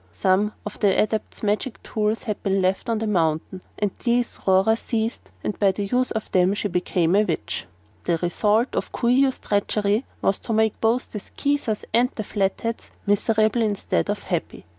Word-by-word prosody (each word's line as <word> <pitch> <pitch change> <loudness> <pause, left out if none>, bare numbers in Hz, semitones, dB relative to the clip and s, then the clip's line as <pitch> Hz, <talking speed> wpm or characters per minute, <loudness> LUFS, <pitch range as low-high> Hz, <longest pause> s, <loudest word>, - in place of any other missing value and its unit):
Some 195 +3 +2
of 210 - -6
the 200 -2 +3
Adepts' 215 +1 -1
magic 210 +4 -1
tools 215 +1 -1
had 210 -4 -3
been 195 0 +1
left 190 +4 0
on 230 - +1
the 220 - -2
mountain, 175 -2 0 0.2
and 205 -2 0
these 240 0 +1
Rora 190 +4 +5
seized 225 0 -3
and 210 - -3
by 200 -2 +4
the 200 +2 -3
use 250 +5 +1
of 220 - -4
them 185 +2 +3
she 205 - -2
became 180 -1 +1
a 205 - +6
witch. 150 - -3 0.4
"The 170 -1 +2
result 210 +8 +1
of - - -2
Coo 235 - 0
ee 265 +3 +5
oh's 260 - -2
treachery 205 +2 0 0.2
was 195 - +2
to 230 - -3
make 220 -1 +1
both 230 +3 +1
the 210 - -4
Skeezers 280 -1 -2
and 245 +2 +4
the 215 - -3
Flatheads 205 +3 -2 0.2
miserable 215 +2 +2
instead 205 - 0
of - - -2
happy. - - -3
210 Hz, 185 wpm, -23 LUFS, 195-225 Hz, 0.4 s, a